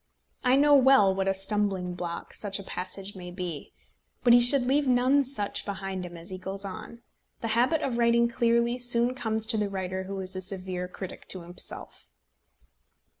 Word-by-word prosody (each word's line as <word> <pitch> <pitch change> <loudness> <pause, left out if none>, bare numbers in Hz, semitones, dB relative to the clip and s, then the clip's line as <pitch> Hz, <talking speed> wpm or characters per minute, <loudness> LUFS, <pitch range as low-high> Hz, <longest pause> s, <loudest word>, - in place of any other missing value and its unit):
I 250 0 +4
know 290 +1 +4
well 265 -8 +5
what 190 0 -2
a 195 - +2
stumbling 195 -2 +2
block 175 -1 -6
such 200 -2 -1
a 200 - -8
passage 190 +2 -5
may 180 -1 -8
be. 175 -4 -6 0.5
But 240 - +6
he 240 - +7
should 245 +1 +4
leave 280 +2 +1
none 255 +3 +3
such 240 -6 +1
behind 190 -2 -5
him 175 0 -11
as 165 +2 -6
he 185 - -6
goes 195 +2 -4
on. 230 +5 -9 0.4
The 230 - -3
habit 245 +8 +1
of 240 -3 -2
writing 235 0 +3
clearly 235 +1 +1
soon 240 0 +3
comes 220 -4 -2
to 220 - 0
the 210 -1 -1
writer 190 -1 -4
who 195 0 -6
is 185 0 -2
a 185 - -4
severe 185 -1 -2
critic 185 0 -9
to 185 - -4
himself. 175 +1 -7
200 Hz, 185 wpm, -27 LUFS, 185-240 Hz, 0.5 s, he